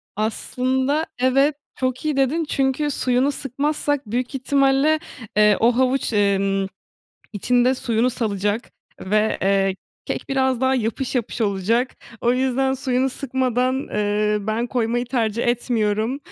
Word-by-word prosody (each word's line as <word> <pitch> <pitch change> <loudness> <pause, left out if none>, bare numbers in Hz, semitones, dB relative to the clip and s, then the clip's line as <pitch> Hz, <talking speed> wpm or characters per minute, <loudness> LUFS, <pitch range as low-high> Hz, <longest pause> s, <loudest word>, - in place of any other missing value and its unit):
Aslında 260 +7 0
evet, 275 +3 +3 0.2
çok 255 +2 -2
iyi 300 -2 0
dedin. 285 +5 +2
Çünkü 270 +2 0
suyunu 255 +1 +1
sıkmazsak 290 +1 -2
büyük 250 +3 -2
ihtimalle, 275 +3 +2 0.4
eee, 210 -1 +5
o 230 +1 +3
havuç, 260 -2 +1
emm, 195 -1 +1 0.7
içinde 245 +5 +2
suyunu 240 0 0
salacak 210 -1 -2 0.3
ve, 215 +3 +1
eee, 195 0 +2 0.3
kek - - -4
biraz 265 -2 +1
daha 260 0 +2
yapış 240 +2 -2
yapış 240 -1 -2
olacak. 220 +5 0 0.2
O 240 - +2
yüzden 265 +1 +1
suyunu 260 0 0
sıkmadan, 260 0 -1
eee, 210 0 0
ben 220 +3 -1
koymayı 240 -1 -1
tercih 235 -2 -1
etmiyorum. 230 0 0
250 Hz, 125 wpm, -22 LUFS, 220-265 Hz, 0.7 s, eee